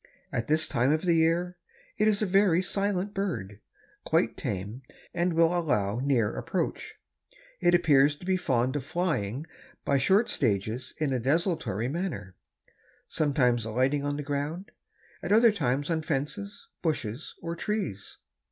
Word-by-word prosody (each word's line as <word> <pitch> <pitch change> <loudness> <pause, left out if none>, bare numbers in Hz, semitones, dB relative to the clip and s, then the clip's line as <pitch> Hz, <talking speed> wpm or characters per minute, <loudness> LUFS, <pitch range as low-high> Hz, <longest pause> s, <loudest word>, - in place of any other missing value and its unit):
At 115 - -2
this 155 +1 +2
time 125 +4 +2
of 155 +1 +1
the 175 -2 +3
year 165 +2 +1 0.4
it 215 - +2
is 215 0 +2
a - - +2
very 190 -2 +3
silent 200 0 -1
bird, 105 - -3 0.4
quite - - +1
tame 100 +6 -4 0.3
and 175 0 0
will 165 +1 +3
allow 120 - 0
near 125 -5 +1
approach. - - -3 0.6
It 175 - +4
appears 150 -4 +4
to 165 - -13
be 190 0 +2
fond 130 -6 0
of 145 - -2
flying 150 - -2 0.4
by 140 -1 +2
short 195 - +3
stages 110 +1 -1
in 150 -4 0
a 130 - 0
desultory 135 - 0
manner, 135 - -4 0.7
sometimes 125 -6 +1
alighting 130 +6 0
on 145 0 -2
the 150 - -4
ground, 145 +7 -3 0.5
at - - -4
other 225 +2 +6
times 145 -5 -1
on 160 -1 0
fences, 160 +8 -4
bushes 140 -5 -3
or 170 0 -3
trees." 185 - -4
150 Hz, 150 wpm, -28 LUFS, 125-180 Hz, 0.7 s, other